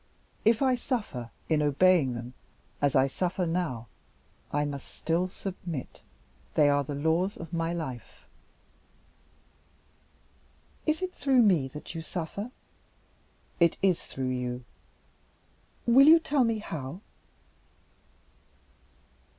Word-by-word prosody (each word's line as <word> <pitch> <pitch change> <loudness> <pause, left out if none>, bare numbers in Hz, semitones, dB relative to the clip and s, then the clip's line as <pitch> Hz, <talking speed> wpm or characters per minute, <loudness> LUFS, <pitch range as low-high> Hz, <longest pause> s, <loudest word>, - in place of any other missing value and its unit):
If 225 +4 +4
I 260 -1 +4
suffer 215 - -3 0.2
in 155 -2 +2
obeying 150 -2 +4
them 120 +1 -7 0.5
as 145 -2 +2
I 130 - +6
suffer 180 +6 -1
now, 165 -9 -2 0.7
I 145 0 +1
must 140 -2 -5
still 170 +3 -1
submit. 180 -6 -6 0.5
They 150 -2 +5
are 145 0 +3
the 145 +1 -5
laws 160 +7 +1
of 165 0 -9
my 165 0 0
life." 150 -8 -6 2.6
"Is 310 +4 +1
it 370 0 -3
through 265 -3 +3
me 175 -11 +4
that 150 +4 -9
you 165 - -4
suffer?" 180 +7 -5 1.1
"It 170 -2 +4
is 185 -3 +3
through 130 -1 -4
you." 125 0 -3 1.2
"Will 265 +4 +7
you 325 +2 +10
tell 290 -5 +2
me 230 -1 +1
how?" 165 -4 -6
165 Hz, 115 wpm, -28 LUFS, 140-200 Hz, 2.6 s, you